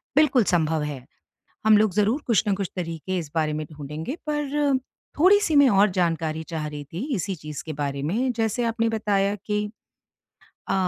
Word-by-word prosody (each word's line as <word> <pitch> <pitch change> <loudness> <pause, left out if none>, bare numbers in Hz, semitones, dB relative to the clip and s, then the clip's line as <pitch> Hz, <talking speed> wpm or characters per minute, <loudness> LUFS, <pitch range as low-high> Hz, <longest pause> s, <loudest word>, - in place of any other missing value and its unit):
बिल्कुल 280 -6 +5
सँभव 160 -4 +1
है। 140 -4 -5 0.6
हम 215 -1 +7
लोग 215 -3 +3
ज़रूर 215 +8 +2
कुछ 230 -5 +3
ना 205 - +2
कुछ 195 -2 -3
तरीके, 175 +1 -3
इस 155 -4 -5
बारे 155 -1 +1
में 155 0 -3
ढूँढेंगे 150 - -6
पर, 290 -2 +1 0.4
थोड़ी 380 +5 +7
सी 320 -7 +1
मैं 285 -2 +7
और 200 0 +4
जानकारी 165 -3 -1
चाह 155 -2 -3
रही 145 -1 -7
थी, 165 +6 -7 0.2
इसी 190 +2 -2
चीज़ 150 -1 -7
के 160 - -5
बारे 140 -1 -3
में। 230 - 0
जैसे 225 +2 0
आपने 230 0 +1
बताया 205 -2 +1
कि 210 +1 -2 1.0
अ, - - 0
195 Hz, 180 wpm, -24 LUFS, 155-230 Hz, 1.0 s, हम